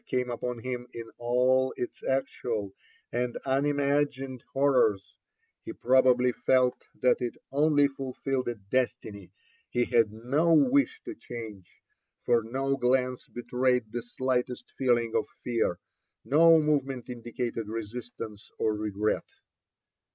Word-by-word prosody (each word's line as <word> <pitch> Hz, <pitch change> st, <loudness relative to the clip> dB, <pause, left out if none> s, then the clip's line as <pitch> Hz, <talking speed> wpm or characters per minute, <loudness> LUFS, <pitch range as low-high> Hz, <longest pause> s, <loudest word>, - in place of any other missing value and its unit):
came 125 Hz, -1 st, 0 dB
upon 120 Hz, +1 st, -3 dB
him 125 Hz, +1 st, -5 dB
in 115 Hz, -, -5 dB, 0.2 s
all 125 Hz, +2 st, +2 dB
its 125 Hz, -, -5 dB
actual 120 Hz, -6 st, -2 dB, 0.4 s
and 120 Hz, 0 st, -1 dB
unimagined 140 Hz, -1 st, 0 dB
hor 140 Hz, +1 st, +2 dB
rors, 105 Hz, -6 st, +2 dB, 0.5 s
he 335 Hz, -, -6 dB
probably 125 Hz, -, +4 dB
felt 125 Hz, +1 st, +1 dB, 0.2 s
that 125 Hz, -, +5 dB
it 120 Hz, -1 st, -2 dB, 0.2 s
only 145 Hz, 0 st, +4 dB
fulQlled 135 Hz, -1 st, -3 dB
a 120 Hz, -, -1 dB
destiny 100 Hz, -2 st, -3 dB, 0.4 s
he 120 Hz, 0 st, +1 dB
had 115 Hz, -3 st, +3 dB
no 135 Hz, +10 st, +1 dB
wish 280 Hz, -, +3 dB
to 355 Hz, -, -5 dB
change, 110 Hz, -, -9 dB, 0.6 s
for 120 Hz, -1 st, +4 dB
no 135 Hz, +5 st, -1 dB
glance 125 Hz, 0 st, +1 dB
betrayed 125 Hz, -1 st, 0 dB
the 120 Hz, -, -3 dB
slightest 125 Hz, 0 st, -2 dB
feeling 120 Hz, -3 st, +1 dB
of 110 Hz, -, +1 dB, 0.2 s
fear, 115 Hz, -7 st, 0 dB, 0.5 s
no 165 Hz, +3 st, +6 dB
move 150 Hz, -2 st, +2 dB
ment 130 Hz, -2 st, -7 dB
indicated 120 Hz, -2 st, -4 dB
resistance 115 Hz, -1 st, -7 dB
orregret. 105 Hz, -1 st, -1 dB
125 Hz, 120 wpm, -28 LUFS, 115-135 Hz, 0.6 s, no